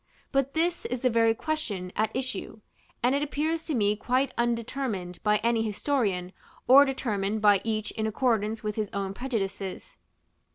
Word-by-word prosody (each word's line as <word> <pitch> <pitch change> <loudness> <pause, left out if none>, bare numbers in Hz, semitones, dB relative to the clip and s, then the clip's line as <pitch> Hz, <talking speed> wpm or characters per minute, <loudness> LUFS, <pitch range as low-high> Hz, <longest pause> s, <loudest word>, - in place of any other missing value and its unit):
But 275 0 0
this 340 +2 0
is 250 -1 -3
the 255 - +2
very 225 0 +3
question 220 - -3
at 215 0 +1
issue; 255 -4 -3 0.4
and 250 +2 +4
it 280 - +1
appears 310 +3 -1
to 310 - -1
me 205 -2 +2
quite 255 +5 0
undetermined 235 -6 -2
by 210 0 +3
any 230 -1 +2
historian, 210 -5 -1 0.3
or 275 +3 +9
determined 215 -6 -1
by 205 -2 +6
each 215 -2 -2
in 220 -1 -2
accordance 220 -1 0
with 210 0 -3
his 215 -2 -1
own 195 -1 -2
prejudices. 195 -5 -4
225 Hz, 160 wpm, -27 LUFS, 205-265 Hz, 0.4 s, or